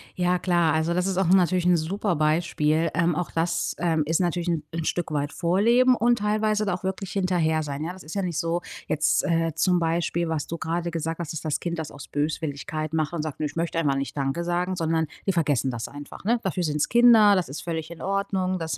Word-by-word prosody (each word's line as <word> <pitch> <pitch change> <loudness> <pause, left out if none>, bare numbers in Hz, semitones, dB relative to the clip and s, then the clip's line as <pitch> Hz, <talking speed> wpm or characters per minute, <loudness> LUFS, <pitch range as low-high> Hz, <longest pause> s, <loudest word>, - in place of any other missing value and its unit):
Ja, 180 -1 +1
klar. 175 -4 +2
Also, 160 +2 +1
das 180 +1 0
ist 190 -2 -1
auch 190 -2 +2
'n 185 - +7
natürlich 180 -1 +2
'n 180 -1 +5
super 180 +4 -1
Beispiel, 155 0 +1
ähm, 170 +1 +1
auch 180 0 -3
das, 165 0 -1
ähm, 165 -3 +1
ist 165 +2 +1
natürlich 175 -1 -1
'n 165 -3 -1
'n 165 0 -2
Stück 175 -1 -2
weit 145 -1 -1
Vorleben 230 - +3
und 240 0 +2
teilweise 215 0 +1
da 200 - 0
auch 180 - -5
wirklich 190 0 -3
hinterher 175 -5 +1
sein. 145 0 -4
Ja, 170 +3 -4
das 185 - -12
ist 155 - -9
ja 200 - 0
nicht 175 -4 -3
so 170 0 -1 0.3
jetzt, 155 +1 +2
äh, 165 -2 +1
zum 180 +2 +2
Beispiel, 170 0 0
was 160 -2 -2
du 170 - -4
gerade 170 +2 -2
gesagt 165 0 -3
hast, 170 -3 -4
dass 155 - -4
das 155 -2 -1
Kind 170 -1 -3
das 160 - -5
aus 145 0 -10
Böswilligkeit 155 +1 -3
macht 155 0 0
und 170 - -2
sagt: 155 -2 -5
„Ne, 155 - -1
ich 145 - -5
möchte 165 0 -1
einfach 145 -4 +1
nicht 135 0 -3
danke 140 +4 -1
sagen,“ 175 +2 -1
sondern 160 -1 0 0.2
die 195 - +2
vergessen 145 -6 +1
das 115 -1 -4
einfach, 145 0 -10
ne? 235 +4 +2
Dafür 185 -1 -1
sind's 150 -2 0
Kinder, 230 -3 +7
das 180 -7 -1
ist 140 - -6
völlig 160 -1 -4
in 170 - -10
Ordnung. 190 -1 -1
Das 160 -1 -3
170 Hz, 240 wpm, -25 LUFS, 155-185 Hz, 0.3 s, n